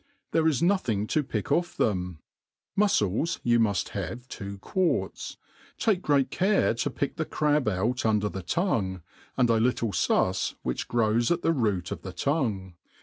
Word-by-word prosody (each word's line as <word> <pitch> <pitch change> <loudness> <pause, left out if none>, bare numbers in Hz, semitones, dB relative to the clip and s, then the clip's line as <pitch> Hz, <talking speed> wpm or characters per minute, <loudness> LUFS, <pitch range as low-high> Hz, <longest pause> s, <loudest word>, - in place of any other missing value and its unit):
There 160 -1 +3
is 160 0 +1
nothing 125 - +1
to 155 - +1
pick 110 -7 -3
ofi^ 175 +1 +1
them. 90 -6 -1 0.5
Mufcles 165 - +1
you 120 -1 +3
muft 100 -6 +1
have 105 +6 -5
two 100 0 -6
quarts; 180 - -1 0.4
take 215 -7 +1
great 140 -5 +2
care 195 - +2
to 120 +5 -1
pick 140 +1 -3
the 160 - 0
crab 150 -4 +1
out 110 +6 0
under 105 -2 +2
the 95 -2 -5
tongue, 95 - -1 0.3
and 125 -2 +4
a 115 -1 +3
little 115 -1 +1
fus - - +1
which - - -2
grows 115 0 +2
at 175 0 0
the 165 - +3
root 105 - 0
of - - -4
the 95 - -7
tongue. 110 - -1
120 Hz, 165 wpm, -27 LUFS, 100-155 Hz, 0.5 s, and